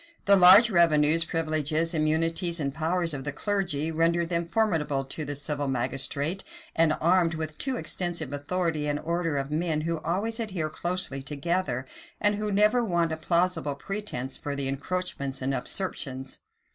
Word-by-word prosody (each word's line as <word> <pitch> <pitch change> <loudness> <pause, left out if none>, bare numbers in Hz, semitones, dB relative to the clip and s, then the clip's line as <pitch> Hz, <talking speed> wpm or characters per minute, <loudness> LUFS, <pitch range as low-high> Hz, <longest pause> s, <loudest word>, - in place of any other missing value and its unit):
The 200 - +6
large 195 +5 +8
revenues, 165 -2 +5
privileges, 160 0 -1
immunities, 165 +2 0
and 140 -2 -2
powers 165 +2 -1
of 135 -2 -5
the 145 - -3
clergy, 165 -3 -2
rendered 165 +1 +1
them 170 -1 -1
formidable 160 -9 0
to 145 +3 -4
the 145 0 -4
civil 145 0 -1
magistrate; 135 +7 -1 0.3
and 160 -1 +3
armed 170 -1 +2
with 155 -1 -4
too 265 -1 +1
extensive 170 - -1
authority 155 +1 -1
an 145 0 0
order 165 -1 -2
of 135 +1 -3
men 155 0 0
who 165 0 -2
always 205 +9 -1
adhere 185 -9 -3
closely 175 -6 -2
together, 145 -2 -2 0.3
and 205 0 +3
who 210 0 -2
never 210 +5 +3
want 170 -6 0
a - - -1
plausible 170 -3 0
pretence 140 -7 -4
for 145 -1 -4
their 140 -1 -1
encroachments 140 -1 -3
and 135 +1 -1
usurpations. 135 -7 -3
165 Hz, 160 wpm, -27 LUFS, 145-180 Hz, 0.3 s, large